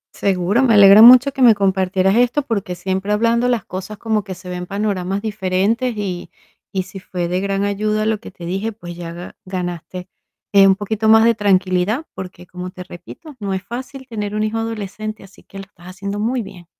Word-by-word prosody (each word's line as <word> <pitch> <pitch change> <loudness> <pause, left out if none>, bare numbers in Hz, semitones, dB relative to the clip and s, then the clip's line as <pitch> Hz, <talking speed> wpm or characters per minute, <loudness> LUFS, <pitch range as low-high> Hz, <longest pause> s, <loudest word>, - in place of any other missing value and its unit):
Seguro, 195 +4 +1
me 245 -4 +4
alegra 200 +1 +8
mucho, 255 +4 +9
que 270 - -5
me 235 -3 +7
compartieras 190 -1 +1
esto, 245 +4 +2
porque 200 -7 -3
siempre, 190 +3 -3
hablando 230 +3 +2
las 240 -5 0
cosas, 190 +3 -7
como 220 -1 -1
que 190 -2 -7
se 185 +1 -13
ven 180 0 -5
panoramas 200 -1 -2
diferentes. 215 +3 -1
Y 185 -4 -4 0.4
y 190 -1 -1
si 195 +1 -10
fue 180 -2 -4
de 180 +1 -1
gran 195 0 -1
ayuda, 210 +1 -1
lo 220 -1 0
que - - -11
te 175 - -11
dije, 195 +6 -2
pues, 175 -5 -10
ya 170 -1 -7
ga-ganaste, 180 0 -7 0.5
eh, 195 -1 +7
un 190 - +5
poquito 215 +2 -2
más 220 0 +7
de 230 0 +5
tranquilidad. 195 - +1
Porque 180 -1 -9
como 180 +1 -7
te 185 0 -9
repito, 190 - -12
no 200 -2 -3
es 190 - -5
fácil 260 +3 -8
tener 210 -4 -4
un 215 - 0
hijo 215 +1 -2
adolescente, 215 -1 -5
así 195 0 -17
que 195 - -13
lo 195 - -7
estás 180 -3 -18
haciendo 200 +2 -5
muy 235 +3 -1
bien. 180 -3 -12
200 Hz, 205 wpm, -19 LUFS, 185-220 Hz, 0.5 s, mucho